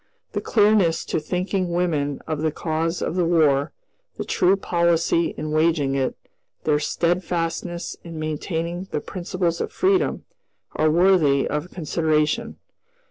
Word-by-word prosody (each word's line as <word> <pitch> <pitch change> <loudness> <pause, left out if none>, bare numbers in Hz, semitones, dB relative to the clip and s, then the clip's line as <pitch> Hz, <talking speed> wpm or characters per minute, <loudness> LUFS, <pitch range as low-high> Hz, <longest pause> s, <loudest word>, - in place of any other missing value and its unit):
The - - -2
clearness 205 -6 +3
to - - -1
thinking 180 +3 -2
women 155 -5 0
of 155 -1 -3
the 160 0 +1
cause 165 +2 -2
of 165 - -2
the 180 - +2
War; 155 -5 +3 0.5
the - - -4
true 185 +2 +3
policy 170 -2 +1
in 155 - -4
waging 155 -3 +2
it; 135 -1 0 0.5
their 150 -1 +2
steadfastness 170 +1 -2
in 165 -2 -8
maintaining 165 +3 -3
the - - -2
principles 175 -1 -2
of - - -3
freedom, 380 0 +1 0.5
are 155 - +3
worthy 165 -5 +4
of 150 +4 -3
consideration. 160 +5 0
165 Hz, 135 wpm, -23 LUFS, 155-180 Hz, 0.5 s, worthy